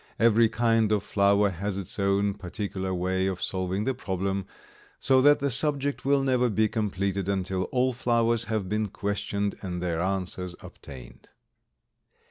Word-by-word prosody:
Every 115 Hz, 0 st, +4 dB
kind 115 Hz, -2 st, +2 dB
of 105 Hz, -2 st, +1 dB
flower 100 Hz, 0 st, +2 dB
has 95 Hz, +3 st, -4 dB
its 100 Hz, +1 st, -6 dB
own 100 Hz, +1 st, +1 dB
particular 95 Hz, 0 st, -5 dB
way 95 Hz, +1 st, 0 dB
of 95 Hz, -2 st, -3 dB
solving 95 Hz, +1 st, -2 dB
the 130 Hz, -, 0 dB
problem, 95 Hz, -4 st, -3 dB, 0.5 s
so 130 Hz, -1 st, +4 dB
that 145 Hz, +2 st, +6 dB
the 140 Hz, -1 st, -1 dB
subject 140 Hz, +2 st, +1 dB
will 140 Hz, 0 st, +3 dB
never 125 Hz, -2 st, +2 dB
be 110 Hz, 0 st, +2 dB
completed 100 Hz, -3 st, -2 dB
until 95 Hz, -1 st, -1 dB
all 130 Hz, 0 st, 0 dB
flowers 115 Hz, -1 st, +1 dB
have 110 Hz, -4 st, -2 dB
been 105 Hz, +2 st, -1 dB
questioned 100 Hz, 0 st, -3 dB
and 90 Hz, -3 st, -4 dB
their 85 Hz, -2 st, -2 dB
answers 90 Hz, -1 st, -2 dB
obtained. 65 Hz, -3 st, -12 dB
100 Hz, 150 wpm, -27 LUFS, 95-115 Hz, 0.5 s, that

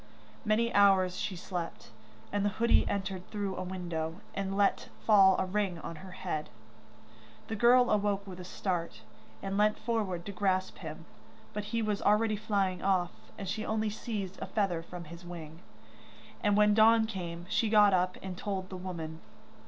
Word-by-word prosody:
Many 230 Hz, +1 st, +2 dB
hours 190 Hz, -2 st, +5 dB
she 200 Hz, -, -2 dB
slept, 175 Hz, -1 st, -6 dB, 0.4 s
and 205 Hz, -1 st, +1 dB
the 205 Hz, -, +3 dB
hoodie 235 Hz, +1 st, +4 dB
entered 190 Hz, -2 st, -3 dB
through 200 Hz, -3 st, -3 dB
a -, -, -4 dB
window, 175 Hz, -2 st, -4 dB
and 195 Hz, 0 st, -2 dB
let 200 Hz, -1 st, +2 dB, 0.2 s
fall 195 Hz, -3 st, +7 dB
a -, -, +1 dB
ring 190 Hz, -2 st, -1 dB
on 165 Hz, 0 st, -7 dB
her 190 Hz, +4 st, -10 dB
hand. 175 Hz, -5 st, -4 dB, 1.0 s
The 220 Hz, -, -2 dB
girl 245 Hz, +3 st, +5 dB
awoke 205 Hz, -1 st, +1 dB
with 185 Hz, -2 st, -9 dB
a -, -, -6 dB
start, 180 Hz, -2 st, -3 dB, 0.4 s
and 195 Hz, +1 st, -1 dB
leant 210 Hz, 0 st, +3 dB
forward 210 Hz, -7 st, -2 dB
to 200 Hz, -, -4 dB
grasp 190 Hz, -1 st, 0 dB
him, -, -, -8 dB, 0.5 s
but 210 Hz, -1 st, -3 dB
he 225 Hz, +2 st, -1 dB
was 210 Hz, -1 st, -1 dB
already 215 Hz, +1 st, +3 dB
flying 200 Hz, -3 st, 0 dB
off, 185 Hz, -3 st, +2 dB, 0.3 s
and 195 Hz, -, -6 dB
she 215 Hz, +4 st, -2 dB
only 220 Hz, -1 st, 0 dB
seized 205 Hz, -3 st, -5 dB
a -, -, -3 dB
feather 195 Hz, -6 st, 0 dB
from 175 Hz, +1 st, -8 dB
his 170 Hz, +2 st, -11 dB
wing. 165 Hz, -2 st, -8 dB, 0.8 s
And 205 Hz, -1 st, +3 dB
when 210 Hz, 0 st, +5 dB
dawn 220 Hz, +1 st, +6 dB
came, 175 Hz, -5 st, -5 dB
she 225 Hz, -, +1 dB
got 210 Hz, -2 st, +6 dB
up 185 Hz, 0 st, +1 dB
and 190 Hz, -1 st, -5 dB
told 190 Hz, 0 st, -4 dB
the 185 Hz, -, -5 dB
woman. 165 Hz, -3 st, -6 dB
195 Hz, 175 wpm, -31 LUFS, 180-210 Hz, 1.0 s, fall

